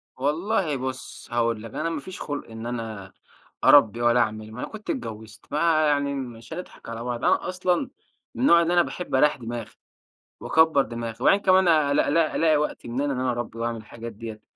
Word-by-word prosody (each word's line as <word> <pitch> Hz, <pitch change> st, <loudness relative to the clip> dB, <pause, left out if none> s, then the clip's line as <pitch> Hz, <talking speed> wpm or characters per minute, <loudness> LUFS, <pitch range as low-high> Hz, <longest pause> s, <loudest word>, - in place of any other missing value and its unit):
والله 160 Hz, +4 st, 0 dB
بُص، 130 Hz, 0 st, -6 dB
هاقول 115 Hz, -2 st, 0 dB
لك. 115 Hz, -, -9 dB
أنا 165 Hz, -, -2 dB
ما 165 Hz, -3 st, -3 dB
فيش 185 Hz, +6 st, -9 dB
خُلق 145 Hz, -5 st, -5 dB
إن 115 Hz, 0 st, -8 dB
أنا 110 Hz, -5 st, -5 dB, 0.5 s
أرَبّي، 120 Hz, -5 st, +6 dB
ولا 120 Hz, 0 st, +4 dB
أعمل، 110 Hz, -2 st, -1 dB
ما 110 Hz, -, -9 dB
أنا -, -, -3 dB
كنت 215 Hz, -1 st, -11 dB
اتجوّزت. 110 Hz, -, -6 dB
ما 155 Hz, 0 st, +3 dB
يعني 145 Hz, -1 st, +1 dB
مش 120 Hz, -4 st, -7 dB
هنضحك 180 Hz, -, -9 dB
على 115 Hz, 0 st, -5 dB
بعض. 120 Hz, -1 st, -4 dB
أنا -, -, +2 dB
أصلًا 185 Hz, +7 st, 0 dB, 0.5 s
من -, -, -5 dB
النوع 170 Hz, -9 st, +6 dB
اللي 170 Hz, +1 st, +1 dB
أنا 175 Hz, -, +5 dB
باحب 175 Hz, -4 st, -4 dB
أريّح 150 Hz, +3 st, +4 dB
دماغي، 120 Hz, -2 st, -6 dB, 0.7 s
وأكبر 160 Hz, -3 st, +4 dB
دماغي. 115 Hz, -2 st, -5 dB
وبعدين 195 Hz, -, +5 dB
كمان 185 Hz, -1 st, +4 dB
أ 155 Hz, -4 st, +4 dB
ألاق 145 Hz, -, +2 dB
ألاق 160 Hz, +1 st, +2 dB
ألاقي 160 Hz, -2 st, +3 dB
وقت 150 Hz, -, -3 dB
منين 135 Hz, +4 st, -1 dB
إن 125 Hz, -, -2 dB
أنا 130 Hz, -1 st, +1 dB
أرَبّي 120 Hz, -1 st, -5 dB
واعمل 115 Hz, 0 st, -2 dB
الحاجات 115 Hz, +1 st, -9 dB
ديّة. 110 Hz, 0 st, -8 dB
130 Hz, 200 wpm, -25 LUFS, 115-160 Hz, 0.7 s, أرَبّي